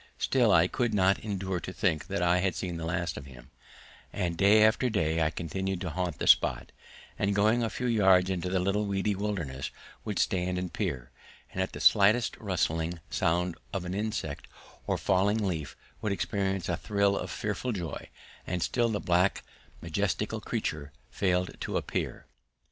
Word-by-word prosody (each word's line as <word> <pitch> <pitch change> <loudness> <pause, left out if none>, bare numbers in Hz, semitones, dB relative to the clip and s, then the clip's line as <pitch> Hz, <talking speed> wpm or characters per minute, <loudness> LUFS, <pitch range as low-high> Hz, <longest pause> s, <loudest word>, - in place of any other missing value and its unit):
Still, 125 -5 +3
I 85 -1 +5
could 120 +2 -1
not 95 0 +3
endure 95 -3 -3
to 90 - -6
think 90 -7 -1
I 90 0 +2
had 95 0 0
seen 90 -3 -3
the 80 - -4
last 85 +1 -2
of 70 - -8
him, 65 0 -14 0.6
and 85 -2 -2
day 105 +4 +6
after 115 +4 +3
day 80 -6 +1
I 75 - +3
continued 95 +3 -3
to 90 -4 -3
haunt 90 -2 -2
the - - -3
spot, - - +4 0.5
and 100 0 +1
going 110 +4 +3
a 115 - 0
few 125 - -4
yards 95 -6 +4
into 90 -1 -2
the 95 0 +1
little 100 +3 0
weedy 100 +1 0
wilderness 90 -10 -3 0.3
would - - -3
stand 90 0 0
and 90 -1 -4
peer, 65 -1 -3 0.4
and 95 - -2
at 95 - -2
the - - -6
slightest 110 +3 +4
rustling 85 -4 -1
sound 90 +1 0 0.2
of 95 -2 -2
an 90 - -4
insect 95 -9 -3 0.4
or - - +1
falling 100 +4 +2
leaf 80 -7 -3 0.2
would 105 - -1
experience 95 -2 -1
a 85 - 0
thrill 100 0 +1
of - - -3
fearful 105 +4 -3
joy, 90 -8 -5 0.4
and 90 0 -1
still 120 -2 +1
the 105 -2 -1
black 90 +2 +2 0.4
majestical - - -1
creature 75 -2 -3 0.2
failed 90 -1 0
to - - -1
appear. - - -3
95 Hz, 175 wpm, -29 LUFS, 85-100 Hz, 0.6 s, day